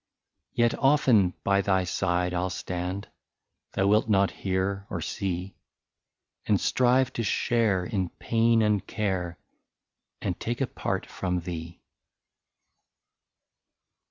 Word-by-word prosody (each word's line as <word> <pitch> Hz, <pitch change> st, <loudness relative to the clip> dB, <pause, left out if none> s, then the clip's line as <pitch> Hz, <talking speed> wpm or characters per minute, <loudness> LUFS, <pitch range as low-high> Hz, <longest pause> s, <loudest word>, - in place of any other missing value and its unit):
'' -, -, -54 dB
Yet 120 Hz, -1 st, +3 dB
often 125 Hz, -10 st, +4 dB
by 100 Hz, 0 st, +3 dB
thy 95 Hz, -1 st, +2 dB
side 90 Hz, 0 st, 0 dB
I -, -, 0 dB
'11 90 Hz, +1 st, 0 dB
stand 90 Hz, +2 st, -4 dB, 0.3 s
— -, -, -57 dB
Thou 95 Hz, -, +1 dB
wilt 105 Hz, +3 st, +3 dB
not 100 Hz, -2 st, +3 dB
hear 95 Hz, +1 st, -2 dB
or 90 Hz, -, -3 dB
see 90 Hz, +3 st, -3 dB, 0.5 s
— -, -, -54 dB
And -, -, +3 dB
strive 130 Hz, +1 st, +2 dB
to 115 Hz, -, -2 dB
share 105 Hz, -3 st, +1 dB
in 95 Hz, -6 st, -1 dB
pain 115 Hz, +2 st, +2 dB
and 105 Hz, -2 st, +2 dB
care. 95 Hz, -5 st, -2 dB, 0.8 s
And -, -, -3 dB
take 120 Hz, +1 st, -3 dB
a 135 Hz, -, +2 dB
part -, -, -3 dB
from 90 Hz, -2 st, -2 dB
thee." 85 Hz, 0 st, -7 dB
100 Hz, 130 wpm, -27 LUFS, 90-115 Hz, 0.8 s, often